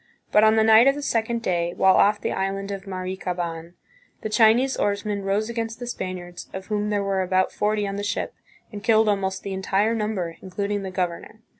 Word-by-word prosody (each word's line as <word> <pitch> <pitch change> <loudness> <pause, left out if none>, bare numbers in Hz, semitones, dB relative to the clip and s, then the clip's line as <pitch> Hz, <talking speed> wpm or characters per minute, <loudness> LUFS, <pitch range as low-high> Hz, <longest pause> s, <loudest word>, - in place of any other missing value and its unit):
But 210 - +5
on 220 0 +5
the 220 - +4
night 220 +3 +7
of 275 - +4
the 290 - -5
second 230 -1 -1
day, 175 -2 -1
while 190 0 +5
off 205 +1 +4
the - - -2
island 195 +1 -2
of 195 0 -6
Marikaban, 180 -3 -4 0.5
the 215 - -3
Chinese 225 +5 +4
oarsmen 205 0 -1
rose 200 +2 0
against 230 -1 -4
the 245 - -6
Spaniards, 185 -6 -6
of 190 0 -6
whom 210 0 -1
there 205 -1 0
were 195 -1 0
about 185 0 +1
forty 210 0 0
on 195 0 -4
the 205 - -3
ship, 205 - -2 0.4
and 205 -2 -8
killed 220 -1 +4
almost 195 -2 -1
the 195 - -4
entire 195 +3 +1
number, 205 -7 -2
including 200 +2 -3
the 190 - -5
governor. 185 +3 -4
200 Hz, 200 wpm, -24 LUFS, 190-220 Hz, 0.5 s, night